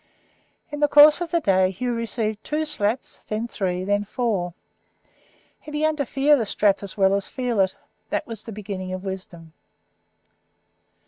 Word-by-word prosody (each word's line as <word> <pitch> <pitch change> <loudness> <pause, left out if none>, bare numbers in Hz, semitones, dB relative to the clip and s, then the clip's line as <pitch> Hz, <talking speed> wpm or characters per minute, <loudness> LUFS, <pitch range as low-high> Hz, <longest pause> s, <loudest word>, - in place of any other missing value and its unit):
In 295 - -5
the 295 - +4
course 295 +3 +7
of 345 - -2
the 340 - +1
day 190 - +3
Hugh 240 +6 -3
received 225 -2 -3
two 310 +1 -2
slaps, 235 -5 -2
then 215 +2 -2
three, 185 -5 -2
then 205 +1 +1
four. 200 -6 -2 1.0
He - - -12
began 305 +1 0
to 285 -4 -2
fear 280 +4 +4
the 230 -6 -1
strap 200 -1 +2
as 200 0 +3
well 195 -1 +4
as 200 0 -1
to - - -17
feel 250 -5 -1
it. 190 -1 +2 0.3
That - - -2
was 225 -3 -7
the 225 - -9
beginning 195 -3 -6
of 185 0 -5
wisdom. 185 -4 -8
215 Hz, 175 wpm, -23 LUFS, 190-270 Hz, 1.0 s, course